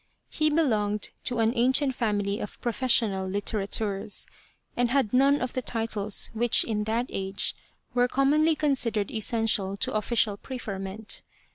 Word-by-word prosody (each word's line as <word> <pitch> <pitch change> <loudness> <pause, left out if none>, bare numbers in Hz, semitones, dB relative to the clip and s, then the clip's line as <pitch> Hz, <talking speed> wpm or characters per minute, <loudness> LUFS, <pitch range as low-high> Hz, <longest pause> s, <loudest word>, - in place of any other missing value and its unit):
He 310 0 +2
be 300 - -1
longed 210 -5 0
to 245 - 0
an 225 0 +2
ancient 260 +3 +2
family 205 -4 -1
of 210 - -7
professional 230 -6 +1
litterateurs, 205 +1 -1 0.5
and 245 -1 +1
had 255 -4 +1
none 275 +3 +4
of 255 0 -3
the 255 - -1
titles 225 -4 0
which 230 +1 +3
in 210 -2 -2
that 230 +3 0
age 195 0 0 0.4
were 245 0 +3
commonly 300 +5 +3
considered 245 -9 0
essential 220 -3 0
to - - -2
official 215 -1 +1
preferment. 205 -4 -4
225 Hz, 140 wpm, -27 LUFS, 205-255 Hz, 0.5 s, none